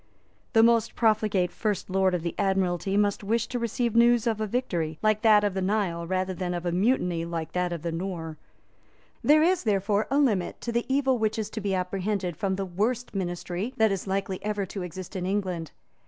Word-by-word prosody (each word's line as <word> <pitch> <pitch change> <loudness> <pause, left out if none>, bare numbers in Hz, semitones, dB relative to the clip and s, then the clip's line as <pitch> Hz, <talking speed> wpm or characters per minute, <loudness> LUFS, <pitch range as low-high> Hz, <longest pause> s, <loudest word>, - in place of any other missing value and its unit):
The 225 -1 +6
most 230 -1 +3
profligate 215 -5 +2
First 210 -4 -2
Lord 190 -1 +2
of 170 - -3
the 170 - -2
Admiralty 190 0 +1
must 205 +1 +1
wish 225 +3 +1
to 245 - -2
receive 235 0 -1
news 235 0 +5
of 220 -2 0
a 215 - 0
victory 175 -10 -2
like 215 0 +2
that 215 -3 +6
of 205 -2 +1
the 190 - -2
Nile 185 -4 -1
rather 185 +1 -1
than 180 -1 -3
of 175 0 -5
a 175 - 0
mutiny 180 -3 +1
like 165 -1 -4
that 180 -1 -1
at 170 -2 -5
the 170 - -2
Nore. 165 -2 -5 0.8
There 305 +2 +5
is, 360 +1 +3
therefore, 205 -1 +1
a 275 - +1
limit 215 -11 +1
to 235 - -3
the 235 +2 -1
evil 265 -2 +2
which 220 0 0
is 215 -2 -3
to 220 - -5
be 195 -1 0
apprehended 185 0 -2
from 190 +3 -1
the 195 0 -3
worst 220 +7 -2
ministry 185 +4 -3
that 220 -3 +4
is 195 0 -3
likely 190 -1 -2
ever 210 -1 -1
to 190 +1 -6
exist 180 +2 -7
in 180 -1 -2
England. 185 -5 -2
195 Hz, 210 wpm, -27 LUFS, 180-220 Hz, 0.8 s, The